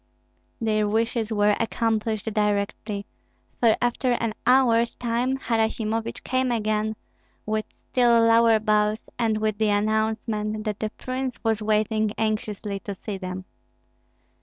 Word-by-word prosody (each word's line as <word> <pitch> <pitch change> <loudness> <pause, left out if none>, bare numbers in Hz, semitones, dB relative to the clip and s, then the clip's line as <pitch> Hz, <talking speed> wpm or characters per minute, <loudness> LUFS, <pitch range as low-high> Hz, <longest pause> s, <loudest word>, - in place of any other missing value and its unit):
Their 215 -2 +1
wishes 225 +1 0
were 205 -1 +3
accomplished 225 -2 -1
directly; 205 0 -1 0.5
for 230 -2 +5
after 245 +1 +1
an 230 -2 -1
hour's 235 -2 +4
time 245 +2 0
Harasimovich 225 -2 -1
came 255 0 0
again, 215 -1 0 0.5
with 215 0 -1
still 240 -2 +2
lower 230 0 +5
bows, 215 0 +1 0.2
and 225 -2 +1
with 215 -1 -1
the 215 -1 +2
announcement 215 0 0
that 210 -2 -3
the 215 - -1
prince 255 0 -4
was 225 -2 +1
waiting 215 0 +1
anxiously 210 -2 -2
to 200 0 -6
see 195 +1 -6
them. 185 0 -6
220 Hz, 125 wpm, -25 LUFS, 210-230 Hz, 0.5 s, for